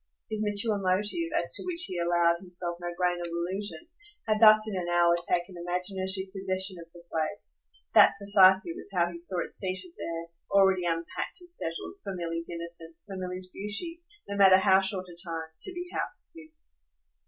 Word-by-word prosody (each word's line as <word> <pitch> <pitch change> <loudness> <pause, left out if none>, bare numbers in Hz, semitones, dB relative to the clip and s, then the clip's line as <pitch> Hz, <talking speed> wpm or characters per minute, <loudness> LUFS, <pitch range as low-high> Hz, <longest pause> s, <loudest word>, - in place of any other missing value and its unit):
His 215 -1 -2
mature 210 0 +1
motive, 205 - 0
as - - 0
to - - 0
which 360 -1 0
he 180 - -4
allowed 170 0 +2
himself 175 -1 -5
no 175 - -4
grain 180 -1 +1
of 175 - -4
illusion, 185 - -4 0.4
had 215 -1 +2
thus 215 0 +7
in 210 - -3
an 175 -2 -3
hour 175 0 +4
taken 175 +2 0
imaginative 190 +2 -2
possession 190 -1 -1
of 165 0 -12
the 175 0 -15
place: 160 +6 -2 0.3
that - - +7
precisely 200 - +5
was 350 - -10
how 175 -2 +1
he 170 - -8
saw 175 +1 +2
it - - -14
seated 185 -2 0
there, 170 0 -5 0.2
already 190 -2 +4
unpacked 165 0 -3
and 355 -1 -14
settled, 165 - -5
for 195 - -5
Milly's 165 -1 -4
innocence, 170 -1 -7
for 200 -2 -8
Milly's 185 0 -3
beauty, 330 - -4 0.3
no 200 - -4
matter 190 -2 +7
how 190 0 +5
short 190 -1 -1
a 175 - -12
time, 165 -2 -5
to - - -1
be 355 0 -6
housed - - -3
with. 325 -1 -13
185 Hz, 185 wpm, -28 LUFS, 175-205 Hz, 0.4 s, thus